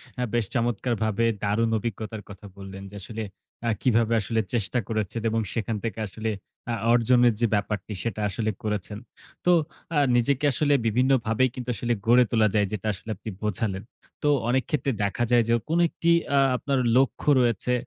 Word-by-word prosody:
হ্যাঁ। 125 -1 -2
বেশ 120 -3 +1
চমৎকারভাবে 115 -1 0 0.2
দারুণ 110 +3 +1
অভিজ্ঞতার 110 -1 -5
কথা 100 +1 -11
বললেন। 95 0 -9
যে, 105 - -11
আসলে 110 +2 -5 0.4
আ - - +3
কিভাবে 115 -2 +2
আসলে 110 +2 0
চেষ্টা 120 +2 0
করেছেন 110 0 -2
এবং 115 0 0
সেখান 115 -1 -2
থেকে 115 -1 -3
আসলে 110 +3 -4 0.4
আ - - 0 0.2
অর্জনের 120 0 +4
যে, 120 - +3
ব্যাপারটি 105 0 -2
সেটা 110 -2 -3
আসলে 110 +3 -1
করেছেন। 105 -1 -3 0.5
তো 180 - +5 0.4
আ - - +2 0.2
নিজেকে 140 +4 +2
আসলে 145 +1 +2
বিভিন্নভাবে 120 0 +2
কিন্তু 125 -1 -6
আসলে 120 0 -1
গড়ে 125 +2 +7
তোলা 110 -2 +4
যায় 105 -2 +3
যেটা 105 0 -4
আসলে 100 +4 -11
আপনি 105 +3 -8
বোঝালেন। 100 -1 -2 0.4
তো - - +2 0.2
অনেক 130 +1 +2
ক্ষেত্রে 140 -4 0
দেখা 100 +4 0
যায় 120 -1 +5
যে, 115 - +3 0.2
কোন 165 +2 +2
একটি 170 +2 0 0.3
আ - - +6 0.2
আপনার 135 0 -1 0.2
লক্ষ্য 135 +2 +1
রয়েছে 120 +1 +1
115 Hz, 170 wpm, -25 LUFS, 105-120 Hz, 0.5 s, গড়ে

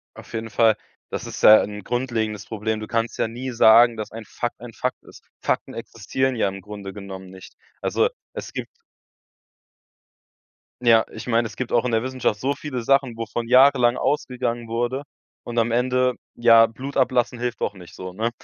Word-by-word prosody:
Auf - - -13
jeden 115 0 -4
Fall, 110 +1 +4 0.3
das - - -4
ist - - -7
ja 110 0 +9
'n 105 0 -5
grundlegendes 115 -4 -2
Problem. 110 0 -3
Du 110 - -6
kannst 115 0 -1
ja - - +1
nie 125 +3 -5
sagen, 115 0 +6
dass 110 - -5
ein 115 0 -8
Fakt 120 +2 -4
ein 120 -1 -9
Fakt 125 +3 -3
ist. - - -16 0.2
Fakten - - -1
existieren 125 +3 -2
ja 110 - +1
im 95 0 -5
Grunde 100 -1 -8
genommen 95 -2 -9
nicht. 95 0 -13 0.3
Also, - - +2 0.2
es - - -7
gibt - - -5 2.1
ja, 115 -2 +5
ich 110 - -9
meine, 115 -1 +2
es 110 - -8
gibt 125 - -4
auch 120 - +4
in 125 - -1
der 115 0 +1
Wissenschaft 130 -5 -1
so 140 +4 0
viele 130 -5 -5
Sachen, 135 -2 +2
wovon 115 +1 -4
jahrelang 130 -2 +5
ausgegangen 125 -4 -1
wurde, 120 +4 -1 0.4
und 120 0 -7
am 115 0 +2
Ende, 125 +1 +2 0.2
ja, 115 -1 +6
Blut 135 +5 -8
ablassen 125 -2 +2
hilft 120 -1 -3
doch - - -1
nicht 90 -3 -13
so, 90 0 -7
ne? 110 +4 -1
115 Hz, 185 wpm, -23 LUFS, 110-125 Hz, 2.1 s, ja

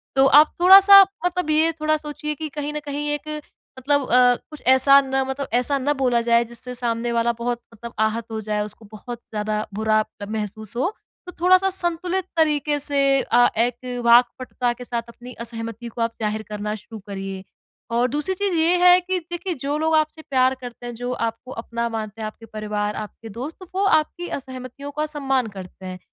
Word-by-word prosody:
तो 270 0 +5
आप 305 +1 +6
थोड़ा-सा 390 +2 +10 0.2
मतलब 360 -2 -1
ये 315 +2 +3
थोड़ा 310 0 +2
सोचिए 300 0 -5
कि 310 +1 -5
कहीं 295 +1 -5
न 300 - -3
कहीं 290 +1 -4
एक 295 +1 -6 0.5
मतलब 285 +2 +1
अ, 250 0 +5
कुछ 305 -2 -11
ऐसा 265 +2 +7
ना 265 0 -1
मतलब 265 +1 -4
ऐसा 250 +4 +1
ना 280 +2 0
बोला 245 -2 +3
जाए 235 0 +3
जिससे 235 +2 -8
सामने 235 -1 -2
वाला 235 0 +1
बहुत 240 0 -2
मतलब 235 +1 -10
आहत 220 +1 0
हो 220 - -3
जाए 210 0 -2
उसको 210 +2 -11
बहुत 235 +2 -8
ज़्यादा 210 0 -2
बुरा 215 +1 +2 0.3
महसूस 215 0 -5
हो। 350 - 0 0.3
तो 360 - -8
थोड़ा-सा 370 +2 +5
संतुलित 360 0 -1
तरीके 300 -2 +2
से 285 0 +2 0.2
अ, 245 0 +4
एक 245 +1 -1
वाक्पटुता 245 +1 +3
के 245 - -10
साथ 240 -1 -3
अपनी 245 +1 -11
असहमति 230 0 -6
को 235 +1 -6
आप 230 0 +1
ज़ाहिर 215 0 -1
करना 210 0 -3
शुरू 215 +1 -11
करिए। 195 -1 -6 0.5
और 240 +2 +2
दूसरी 295 +7 -1
चीज़ 400 0 -1
ये 330 +2 +3
है 360 0 +8
कि 370 +1 -2
देखिए 345 +2 -5
जो 285 +2 -1
लोग 320 +1 +1
आपसे 310 +1 0
प्यार 260 -3 +2
करते 245 0 -9
हैं, 240 - -5
जो 245 +2 -4
आपको 230 +2 -4
अपना 235 0 -4
मानते 220 -1 -5
हैं, - - -3
आपके 220 +1 -11
परिवार, 210 -1 -3
आपके 215 +1 -8
दोस्त, 255 +9 -7 0.2
वो 390 - +1
आपकी 345 0 +1
असहमतियों 260 +1 -9
का 300 +1 -2
सम्मान 270 -5 0
करते 185 0 -10
हैं। 185 0 -7
250 Hz, 190 wpm, -22 LUFS, 230-300 Hz, 0.5 s, थोड़ा-सा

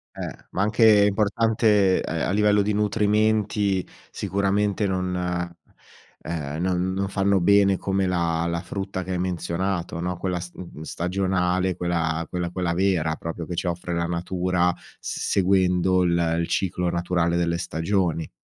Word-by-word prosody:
Eh, - - -7
ma 95 - -1
anche 105 -1 +5
importante, 105 -1 +2
ehm, - - -2
a - - -1
livello 105 0 +3
di 105 +1 0
nutrimenti 105 -2 +1 0.2
sicuramente 100 +1 0
non, 90 -1 -1
ehm, 85 -3 -6
non 90 0 0
non 95 +1 -1
fanno 95 0 +2
bene 100 +1 +4
come 95 0 0
la 85 -2 0
la 85 0 -1
frutta 95 +1 -4
che 95 - -5
hai 90 - -1
menzionato, 90 -1 -2
no. 90 0 -2
Quella 90 -1 -2
st 90 0 -10
mhmm, 85 -4 -9
stagionale, 90 +1 0
quella 85 -2 -1
quella 90 -1 -2
quella 90 -1 -2
vera 85 -4 +1
proprio 85 0 -6
che 90 - -5
ci 85 - -2
offre 85 0 -3
la 85 - 0
natura 90 +1 0 0.3
s - - -5
seguendo 95 -1 +3
il, 85 -1 +2
ehm, 85 0 +1
il 85 - -2
ciclo 90 -2 0
naturale 85 0 0
delle 85 0 0
stagioni. 85 -1 -1
90 Hz, 155 wpm, -24 LUFS, 85-100 Hz, 0.3 s, anche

